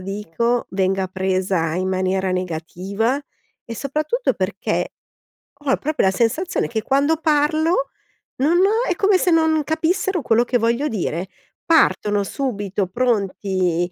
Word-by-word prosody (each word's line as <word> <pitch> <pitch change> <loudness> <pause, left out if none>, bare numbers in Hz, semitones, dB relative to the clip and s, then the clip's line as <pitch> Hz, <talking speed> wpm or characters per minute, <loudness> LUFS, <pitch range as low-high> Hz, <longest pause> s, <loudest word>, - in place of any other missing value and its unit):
dico, 210 +5 -2
venga 190 0 0
presa 185 -3 -1
in 185 +1 -1
maniera 190 0 0
negativa 185 - -2 0.4
e 230 - -7
soprattutto 305 - -1
perché - - -2 0.7
ho 270 - +2
proprio 305 -5 0
la - - +3
sensazione 235 - 0
che 225 -2 -2
quando 280 +6 +2
parlo, 310 0 +1 0.5
non 300 +7 +2
ho 425 +5 +3
è 360 - +1
come 395 +1 +3
se 365 - +1
non 320 -2 +3
capissero 335 +3 0
quello 235 -2 +2
che 245 - +1
voglio 235 +5 +1
dire. 185 - -2 0.4
Partono 210 -11 +3
subito 205 -5 -2
pronti, 190 -5 0
230 Hz, 130 wpm, -21 LUFS, 190-310 Hz, 0.7 s, la